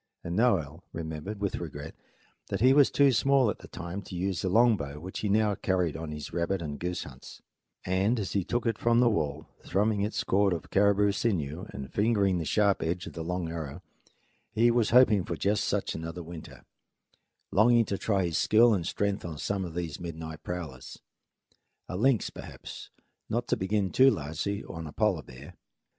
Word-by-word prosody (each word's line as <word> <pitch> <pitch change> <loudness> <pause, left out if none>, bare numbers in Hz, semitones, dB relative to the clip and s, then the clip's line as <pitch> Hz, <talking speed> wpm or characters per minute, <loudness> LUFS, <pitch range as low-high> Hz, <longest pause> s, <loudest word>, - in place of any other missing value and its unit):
As 85 - -5
for - - -2
Noel, 90 -8 +1
he - - -7
remembered 80 +6 -5
with 100 -2 -1
regret 75 -2 -7 0.5
that 100 - -2
he 130 +5 +6
was 145 -1 +6
too 140 -1 +4
small 130 -1 +3
at - - -8
the - - -12
time 85 +4 -6
to 95 - -9
use 95 0 -1
the 95 - -1
long 115 +3 +5
bow 70 -5 -6
which 95 +4 -6
he 105 - -1
now 105 0 +3
carried 95 -6 0
on 80 0 -5
his 75 -1 -7
rabbit 85 +3 0
and 75 -3 -5
goose 90 0 -3
hunts; - - -12 0.4
and 95 +6 +1
as 100 - -3
he 100 - 0
took 120 +7 -2
it 115 -2 0
from 120 0 +3
the 120 -1 +5
wall, 75 -6 -2 0.2
thrumming 105 +2 +1
its 105 +2 -1
chord 100 -1 +2
of 85 +1 -6
caribou 100 0 +4
sinew 90 -7 -2
and 70 0 -8
fingering 100 -4 +2
the 80 - -3
sharp 100 +5 +2
edge 85 +2 -2
of - - -9
a 85 - -4
long 90 +1 -2
arrow, 80 +1 -6 0.7
he 115 +2 +4
was 115 -2 +2
hoping 115 -6 +5
for 85 - -4
just 100 +7 0
such - - -1
another 85 +2 -6
winter, 80 -1 -10 0.9
longing 115 +3 +5
to 100 - -2
try 95 -2 0
his 85 -2 0
skill 115 +1 +5
and 90 -5 -1
strength 100 -1 -1
on 80 -3 -6
some 100 +5 -2
of 85 -3 -7
these 85 -3 -4
midnight 80 -2 -7
prowlers 75 -7 -7 0.9
a 90 - -5
lynx, 120 +4 +2
perhaps, - - -9 0.4
not 120 +1 -1
to - - +2
begin 95 0 -1
too 130 +1 +6
largely 80 - -3
on 80 -1 -7
a - - -8
polar - - +1
bear. - - -12
95 Hz, 200 wpm, -29 LUFS, 85-105 Hz, 0.9 s, he